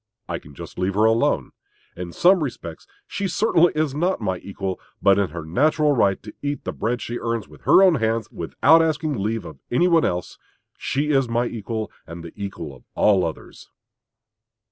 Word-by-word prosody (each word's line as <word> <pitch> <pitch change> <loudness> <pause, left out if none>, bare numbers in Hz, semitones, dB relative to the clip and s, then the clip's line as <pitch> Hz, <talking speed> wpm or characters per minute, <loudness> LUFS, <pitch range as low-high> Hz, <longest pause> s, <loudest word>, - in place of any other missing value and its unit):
I - - -3
can 70 -1 -16
just - - -9
leave 95 +1 0
her 105 +2 +4
alone. 115 +1 +2 0.4
In 90 -1 -6
some 180 - +4
respects 85 - -7 0.2
she 200 -1 -3
certainly 175 -3 +3
is 155 -3 0
not 175 +6 0
my 95 -5 -2
equal; 95 0 -5 0.2
but 100 0 +4
in 100 -3 +1
her 80 0 -7
natural 150 - +2
right 100 -5 +2
to 105 - -9
eat 145 0 -3
the - - -4
bread 120 +3 -2
she 120 +1 -4
earns 115 -2 -2
with - - -16
her 195 - +7
own 185 -2 +6
hands, 110 0 0
without 140 - +3
asking 155 -1 0
leave 110 +2 -2
of 75 -4 -10
any 150 +9 +3
one 170 -2 +4
else, 90 -1 -2 0.4
she 150 +3 -1
is 135 -4 +2
my 120 +1 +1
equal 110 -1 -4 0.2
and 85 0 -8
the 85 - -10
equal 95 -8 -6
of 65 - -19
all 100 -3 +4
others. 80 -2 -7
115 Hz, 190 wpm, -23 LUFS, 95-150 Hz, 0.4 s, her